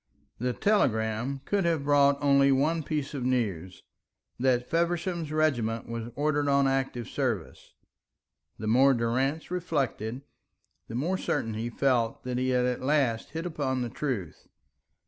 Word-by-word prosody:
That 125 +1 -2
telegram 125 - +1
could 200 -1 +1
have 165 -4 +1
brought 140 -1 +4
only 140 -1 +5
one 150 +5 +2
piece 150 -1 -3
of 135 -3 -3
news, 100 -9 -2 0.6
that 125 -1 +2
Feversham's 170 -1 -1
regiment 120 -8 0
was 115 0 -5
ordered 145 0 +1
on 140 -1 +3
active 135 -4 -1
service. - - -3 0.8
The 110 - -6
more 130 +5 +5
Durrance 130 +8 -1
reflected, 140 - -2 0.6
the 115 - -7
more 175 +9 -1
certain 115 - -1
he 115 +2 -3
felt 120 -2 0
that 125 -1 -2
he 130 0 0
had 125 -1 +2
at 125 -1 -1
last 130 -5 +1
hit 165 +2 -4
upon 135 -6 -1
the 120 - -3
truth. 115 - -4
135 Hz, 145 wpm, -28 LUFS, 120-150 Hz, 0.8 s, only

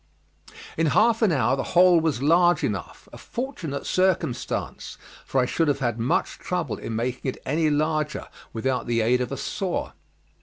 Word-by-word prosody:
In 165 0 +2
half 225 +1 +4
an 215 -5 +4
hour 135 -3 +2
the 135 - -2 0.2
hole 180 -1 +7
was 155 -5 -1
large 175 +3 +4
enough - - -4
a - - -10
fortunate 205 - -5
circumstance, 185 -10 -1 0.3
for 135 - +1
I 125 - +3
should 165 +5 0
have 145 -2 +2
had 120 -4 -2
much 115 +3 0
trouble 175 -9 -3
in 115 - -5
making 125 +3 -2
it - - -5
any 155 +3 +1
larger 155 0 -1 0.2
without 125 +3 -2
the 115 -1 +1
aid 125 +3 +2
of 125 - -3
a - - -3
saw. - - -3
145 Hz, 175 wpm, -24 LUFS, 125-175 Hz, 0.3 s, hole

